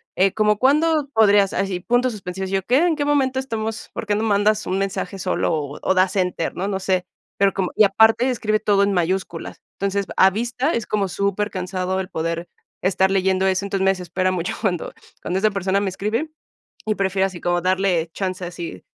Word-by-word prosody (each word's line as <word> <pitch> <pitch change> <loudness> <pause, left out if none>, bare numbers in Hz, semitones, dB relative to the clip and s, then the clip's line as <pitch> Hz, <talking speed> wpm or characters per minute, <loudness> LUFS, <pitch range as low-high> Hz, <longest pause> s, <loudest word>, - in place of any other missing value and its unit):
eh 190 +1 +3
como 210 -1 +2
cuándo 300 +3 +3
podrías 205 -3 +4
así 190 -2 -1
puntos 245 +4 +1
suspensivos". 190 -2 -5
Yo 195 -1 0
qué, 250 - +3
en 330 - +1
qué 295 - -1
momento 270 -3 +1
estamos, 225 -4 -4
por - - -5
qué 205 - +1
no 215 - -1
mandas 210 0 +2
un 185 - 0
mensaje 195 -1 -3
solo 180 -1 0 0.3
o - - +2
das 185 +1 +2
enter, 180 -3 -1
¿no? 190 - -2
No 190 -1 -2
sé, 185 -1 0 0.3
pero 195 0 +3
como 190 -2 -2
y - - +6
aparte 220 +5 +4
escribe 215 -4 0
todo 200 -2 +3
en 200 0 +1
mayúsculas. 180 -1 -2 0.2
Entonces, 200 0 -1
a 190 - +7
vista 240 - -1
es 230 - -1
como 205 -2 0
supercansado 190 -1 -2
el 190 -1 -4
poder 165 0 -3 0.4
estar 190 +1 +2
leyendo 190 0 +2
eso. 190 +1 0
Entonces, 195 -1 -1
me 195 - +5
desespera 185 0 -1
mucho 180 -1 -2
cuando 185 -6 -2 0.3
cuando 185 +2 -1
esa 215 +2 +2
persona 195 0 0
me 200 - 0
escribe 215 - -2 0.6
y 215 - +1
prefiero 190 0 +1
así 185 -3 -7
como 175 0 0
darle 185 -3 +1
chance 185 -1 -3
así 170 - -7
195 Hz, 195 wpm, -21 LUFS, 185-215 Hz, 0.6 s, a